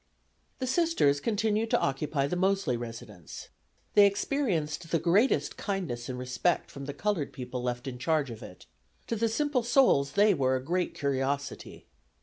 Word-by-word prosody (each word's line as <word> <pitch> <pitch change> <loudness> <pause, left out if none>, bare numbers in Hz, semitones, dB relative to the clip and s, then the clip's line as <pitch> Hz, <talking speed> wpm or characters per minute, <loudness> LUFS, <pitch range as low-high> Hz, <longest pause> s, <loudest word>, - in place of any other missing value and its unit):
The 260 - -3
Sisters 260 - +2
continued 220 +2 0
to - - +3
occupy 140 +1 -1
the 160 - -2
Mosely 190 -7 +1
residence. 115 -7 -8 0.4
They 205 -1 +7
experienced 195 - -1
the 165 - +2
greatest 180 - +2
kindness 165 - -3
and 125 - -4
respect 125 +7 -1
from 140 0 -8
the 145 - -5
colored 180 -4 -1
people 125 -1 -6
left 125 +1 -3
in 125 -2 -6
charge 150 -2 0
of 110 - -9
it. 90 - -12 0.4
To 230 - -2
the 230 +1 +1
simple 290 +2 0
souls 230 - +3
they 205 +3 +5
were 130 -4 +1
a 130 - -3
great 175 +5 -1
curiosity. 140 0 -3
155 Hz, 160 wpm, -29 LUFS, 130-210 Hz, 0.4 s, They